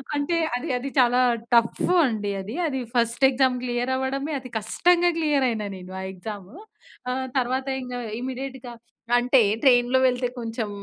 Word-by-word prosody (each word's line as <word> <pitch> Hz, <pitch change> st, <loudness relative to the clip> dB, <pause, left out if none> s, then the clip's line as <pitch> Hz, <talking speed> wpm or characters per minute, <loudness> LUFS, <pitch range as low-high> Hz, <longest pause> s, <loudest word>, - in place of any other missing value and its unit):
అంటే 290 Hz, +4 st, 0 dB, 0.2 s
అది 290 Hz, +6 st, -4 dB
అది 270 Hz, +3 st, -4 dB
చాలా 250 Hz, 0 st, +4 dB, 0.3 s
టఫ్ 235 Hz, +7 st, +3 dB
అండి. 210 Hz, -5 st, -2 dB
అది 205 Hz, +5 st, -7 dB
అది 265 Hz, -3 st, -2 dB, 0.2 s
ఫస్ట్ 235 Hz, +3 st, +2 dB
ఎగ్జామ్ 260 Hz, -1 st, +2 dB
క్లియర్ 245 Hz, +1 st, -1 dB
అవ్వడమే 275 Hz, +3 st, -2 dB
అతి 255 Hz, -2 st, -11 dB
కష్టంగా 350 Hz, +10 st, +2 dB
క్లియర్ 295 Hz, -4 st, +2 dB
అయినా 215 Hz, -3 st, -3 dB
నేను 185 Hz, 0 st, -11 dB
ఆ -, -, -5 dB
ఎగ్జామ్ 195 Hz, 0 st, -8 dB, 0.6 s
ఆ! -, -, 0 dB, 0.3 s
తరువాత 260 Hz, +2 st, -1 dB, 0.2 s
ఇంకా 250 Hz, 0 st, -5 dB, 0.2 s
ఇమ్మీడియేట్‌గా 260 Hz, -1 st, -6 dB, 0.4 s
అంటే 250 Hz, +2 st, +4 dB, 0.2 s
ట్రైన్‌లో 250 Hz, -1 st, +4 dB
వెళ్తే 250 Hz, -1 st, +1 dB
కొంచెం 225 Hz, -2 st, -4 dB
250 Hz, 150 wpm, -24 LUFS, 235-265 Hz, 0.6 s, చాలా